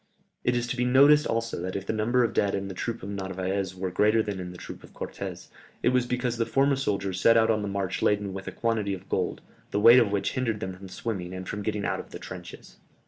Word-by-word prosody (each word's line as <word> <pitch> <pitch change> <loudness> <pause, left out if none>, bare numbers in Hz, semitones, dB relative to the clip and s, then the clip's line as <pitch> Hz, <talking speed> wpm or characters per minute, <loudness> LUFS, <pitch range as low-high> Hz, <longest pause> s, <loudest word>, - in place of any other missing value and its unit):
It 125 - +2
is 120 0 0
to 120 - -3
be 125 - 0
noticed 140 +4 +6
also 115 -4 -2
that 95 +1 -4
if 100 -1 -3
the - - -1
number 120 +3 +2
of 115 -1 0
dead 100 -1 +1
in 100 0 -3
the - - -5
troop 115 +4 -4
of 100 - -5
Narvaez 95 -1 -3
were 95 0 -3
greater 105 +4 +3
than 100 -3 -4
in 90 -1 -5
the 90 - -10
troop - - -9
of - - -15
Cortès, - - -6 0.3
it - - +5
was 125 -1 +2
because 125 -1 -1
the 115 - +1
former 135 +1 +3
soldiers 100 -7 -2
set 115 0 +6
out 110 0 +4
on 110 -1 +1
the 105 - -3
march 100 -1 -2
laden 100 -2 +1
with 95 0 -7
a - - -3
quantity 110 -4 -1
of 95 +1 -13
gold, 90 -2 -1 0.3
the 100 - 0
weight 115 +4 +9
of 110 -5 +2
which 100 -1 0
hindered 120 -5 -1
them 95 -2 -4
from 95 +1 -11
swimming, 95 -3 -4
and 95 0 -6
from 105 - -4
getting 105 -1 -2
out - - -1
of - - -9
the - - -7
trenches." - - -10
105 Hz, 260 wpm, -27 LUFS, 95-115 Hz, 0.3 s, weight